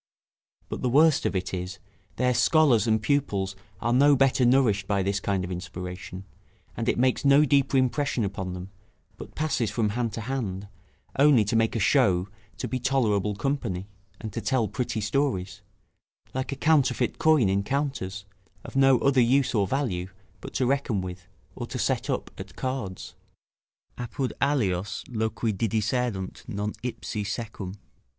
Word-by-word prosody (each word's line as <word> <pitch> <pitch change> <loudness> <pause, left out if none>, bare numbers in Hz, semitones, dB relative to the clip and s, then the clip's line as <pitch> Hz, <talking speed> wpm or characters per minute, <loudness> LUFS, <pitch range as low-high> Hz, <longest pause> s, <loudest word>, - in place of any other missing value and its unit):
But - - -5
the 125 - +1
worst 150 +4 +4
on't 95 -1 -2
is, 90 +1 -4 0.4
their 125 0 +2
scholars 125 -5 +4
and 110 0 +3
pupils 105 -6 0 0.2
are 120 +2 0
no 140 +3 +6
better 135 -1 +3
nourished 120 -6 +3
by 100 -2 +1
this 100 +1 0
kind 95 -1 -1
of 90 - -5
inspiration; 90 +1 -6 0.5
and - - -1
it - - +1
makes 130 +1 +2
no 140 +2 +6
deeper 140 -1 +3
impression 130 -1 +1
upon 95 -2 -3
them, 90 +2 -8 0.5
but - - -10
passes 140 -8 0
from 105 0 0
hand 115 +1 -1
to 115 - -4
hand, 105 -6 -3 0.5
only 140 -6 +6
to 105 - -1
make 115 +1 +2
a - - 0
show 95 -5 +3 0.3
to - - -3
be 130 - -2
tolerable 105 -6 +1
company, 100 -7 -2 0.3
and 110 -3 -7
to 115 - -3
tell 110 +1 +1
pretty 120 -3 -3
stories, 100 -5 -1 0.7
like 130 +2 -3
a - - -2
counterfeit 145 -4 +2
coin 155 -9 +4
in 95 +1 +2
counters, 100 -6 -3 0.4
of - - -10
no 135 -1 +5
other 135 -2 +4
use 130 +3 +3
or 100 -4 +2
value, 95 -10 -1 0.3
but - - -10
to 130 - +2
reckon 135 -6 0
with, 90 0 -7 0.3
or - - -5
to - - -5
set - - -1
up - - -2
at - - -9
cards: 130 -8 -4 0.9
"Apud 125 +2 -3
alios 105 -9 0
loqui 110 -1 -1
didicerunt 110 -1 -1
non 105 +1 -3
ipsi 115 -3 -4
secum." 105 -3 -5
115 Hz, 160 wpm, -26 LUFS, 100-135 Hz, 0.9 s, no